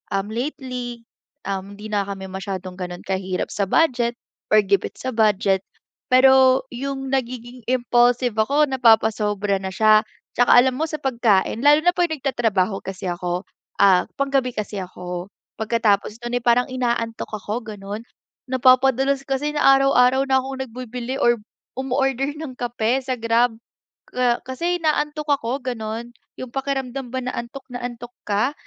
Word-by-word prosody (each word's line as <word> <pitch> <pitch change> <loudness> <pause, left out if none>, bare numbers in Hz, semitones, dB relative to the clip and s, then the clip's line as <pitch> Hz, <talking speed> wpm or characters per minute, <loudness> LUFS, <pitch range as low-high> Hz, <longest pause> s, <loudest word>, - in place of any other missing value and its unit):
um, 195 +2 -2
lately, 245 -1 -5 0.4
um, 195 +1 -4
di 210 +1 -9
na 200 -1 0
kami 195 -1 -6
masyadong 190 -1 -6
ganun 180 -1 -6
kahirap 190 -1 -3
sa 200 -1 -1
budget 240 -3 +2 0.3
or 215 0 +5
gipit 200 -1 0
sa 260 - -4
budget, 205 -4 +2 0.5
pero 260 0 +6
yung 270 +1 -4
nagiging 250 -2 -4
impulsive 245 -1 +2
ako 280 +7 +3
napapasobra 210 -5 +2
na 190 0 -6
siya. 215 +1 +5 0.3
Tsaka 245 - +6
alam 255 +1 +5
mo 320 - 0
sa 310 - -4
pagkain 230 -6 +2
lalo 295 +4 +5
na 355 - +5
pag 355 -1 +1
nagtatrabaho 225 - 0
kasi 190 0 -6
ako, 175 +1 -3 0.4
ah, 185 -2 +5
panggabi 275 -3 0
kasi 210 -1 -4
ako 180 -1 -6 0.3
pagkatapos 215 -2 +1
nun, 240 +1 -1
eh, - - -20
parang 245 +2 +3
inaantok 235 -3 -2
ako 215 +3 -4
ganun, 205 +3 -7 0.4
napapadalas 260 +1 +3
kasi 275 +2 -1
na 295 - -1 0.2
araw-araw 265 -1 +4
na 265 0 +4
akong 265 0 -6
nagbibili 250 +1 -6
or 240 0 +4 0.4
umo-order 270 +1 0
ng 305 -4 -6
kape 240 +1 0
sa 260 0 -2
Grab 230 0 +2 0.5
ka 245 -1 +1
kasi 335 +8 -2
inaantok 300 -1 -1
ako 270 -2 0
ganun. 235 -1 -4 0.3
Yung 255 - -6
pakiramdam 270 -1 -3
ba 260 - -2
na 255 - -3
antok 240 +3 -6
na 245 0 -6
antok 240 0 -7
ka 210 +7 +1
240 Hz, 150 wpm, -22 LUFS, 210-265 Hz, 0.5 s, pero